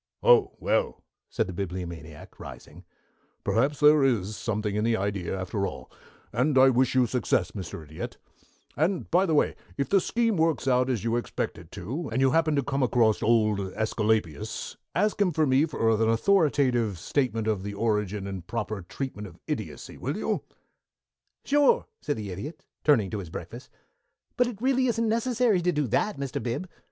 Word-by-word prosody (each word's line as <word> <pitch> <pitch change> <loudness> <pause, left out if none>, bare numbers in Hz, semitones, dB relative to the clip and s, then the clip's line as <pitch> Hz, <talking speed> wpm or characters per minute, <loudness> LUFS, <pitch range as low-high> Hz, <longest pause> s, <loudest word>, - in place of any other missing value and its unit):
"Oh, 480 -4 +5
well," - - 0 0.3
said 110 - 0
the 95 - -6
Bibliomaniac, 85 -4 -6
rising, - - -11 0.6
"perhaps 140 +6 +1
there 150 -1 +6
is 110 -6 +1
something 105 -2 -2
in 105 - 0
the 115 0 +2
idea 95 -2 -2
after 100 +2 -2
all, - - -9 0.4
and 130 +5 +2
I 130 0 +7
wish 130 +1 +2
you 130 -1 +5
success, 120 0 0
Mr. 95 -3 -7
Idiot 75 +1 -7 0.6
and, 170 +4 0
by 185 +3 +4
the 160 - +2
way, - - +2 0.2
if 140 - -1
the 195 -1 +4
scheme 230 0 +1
works 160 -3 +1
out 125 0 +3
as 120 -6 -1
you 115 +1 +1
expect 120 - -3
it 80 -1 -15
to, 130 - -5
and 115 - 0
you 135 -1 +4
happen 160 0 +2
to 140 - +1
come 140 0 -1
across 115 -3 +3
old 110 -2 +3
Æsculapius, 105 -4 -1 0.2
ask 210 +3 +1
him 190 -3 +3
for 155 -1 +2
me 135 +3 +3
for 115 -7 +1
an 110 0 +2
authoritative 125 - +2
statement 115 - -1
of 110 -3 0
the 100 +1 -5
origin 105 -2 -1
and 95 -3 -6
proper 110 -3 -3
treatment 105 +3 -6
of 85 - -14
idiocy, - - -5
will - - -3
you?" - - -1 1.0
"Sure," 290 - +4 0.2
said 145 - -2
the 105 -3 -5
Idiot, 130 - -7 0.2
turning 115 -11 +3
to 105 - -3
his 90 -4 -7
breakfast, - - -8 0.7
"but 250 - +3
it 230 -5 -6
really 260 -1 +3
isn't 230 -1 +1
necessary 230 -3 +2
to 180 +1 +2
do 150 -3 0
that, 210 - 0
Mr. 140 -2 -3
Bib. 125 +10 -3
120 Hz, 180 wpm, -27 LUFS, 105-155 Hz, 1.0 s, I